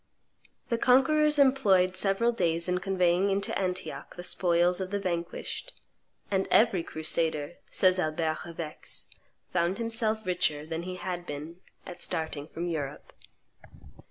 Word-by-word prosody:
The 235 -2 0
conquerors 300 +5 +4
employed 205 -10 +4
several 200 +5 +2
days 170 -7 0
in 180 0 +1
conveying 185 0 +2
into 195 0 0
Antioch 185 -1 -3
the 175 - -7
spoils 175 0 +2
of 185 - -3
the 200 +1 -1
vanquished; 180 - -4 0.5
and 195 -1 +1
"every 210 -5 +4
crusader," 160 0 -1
says 185 -1 +3
Albert 155 -1 0
of 170 0 -10
Aix, 155 -2 -6 0.5
"found 175 +1 +1
himself 225 -1 -1
richer 155 -5 0
than 160 +1 -4
he 180 +1 -5
had 175 -1 -5
been 150 +4 -6 0.3
at 180 - -9
starting 160 -2 -2
from 170 +1 -5
Europe." 150 -4 -4
180 Hz, 135 wpm, -29 LUFS, 165-200 Hz, 0.5 s, conquerors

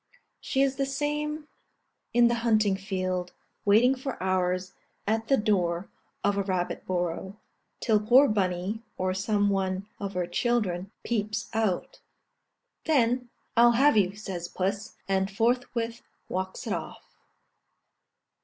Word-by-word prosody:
She 270 - +1
is 270 -1 0
the 275 - +1
same 295 +2 -2 0.6
in 240 0 +5
the 235 - +2
hunting 215 -4 +3
field, 185 -2 -3 0.3
waiting 225 +6 +5
for 265 +1 -5
hours 185 0 0 0.3
at 225 +2 0
the 270 - +4
door 185 -5 0 0.3
of 205 0 +2
a - - +2
rabbit 185 -2 -2
burrow, 185 +3 -2 0.4
till 220 -3 +3
poor 250 +7 +6
Bunny, 195 +1 -1 0.2
or 185 0 0
some 205 +1 +1
one 190 0 -1
of 200 -1 -4
her 180 -1 0
children, 190 -1 0
peeps 215 -1 -2
out; 220 -5 -1 0.9
then, 250 -4 +2 0.3
"I'll 235 0 +7
have 275 +4 +5
you," 195 -2 +3
says 190 -5 -5
puss, 195 +4 -3
and 190 0 +1
forthwith 235 +2 0 0.3
walks 185 0 -4
it - - -1
off. - - -7
205 Hz, 130 wpm, -28 LUFS, 185-235 Hz, 0.9 s, I'll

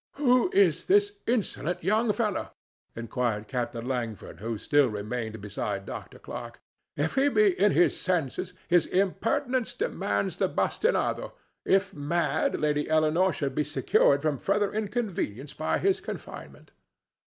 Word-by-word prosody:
"Who 255 +1 +3
is 400 0 +3
this 410 +1 +3
insolent 180 - -1
young 215 +5 +2
fellow?" 210 -2 -1 0.5
inquired 115 -2 -2
Captain 120 -2 -3
Langford, 120 -5 -4
who 115 +2 -3
still 145 +5 +3
remained 110 +1 -4
beside 100 -1 -4
Dr. - - -8
Clarke. - - -8 0.4
"If 145 +2 0
he 275 +1 +3
be 425 +7 +4
in 205 - +5
his 175 +4 +4
senses, 180 0 -1
his 175 -2 +3
impertinence 240 +7 0
demands 470 +4 -1
the - - +1
bastinado; 475 +3 0 0.3
if 195 0 +2
mad, 160 +4 0
Lady 150 0 0
Eleanore 155 +4 +3
should 140 -3 -3
be 150 - +1
secured 140 0 +2
from 150 -4 0
further 200 +1 0
inconvenience 200 - -3
by 155 - -1
his 390 -1 +1
confinement." - - -9
165 Hz, 135 wpm, -27 LUFS, -, 0.5 s, in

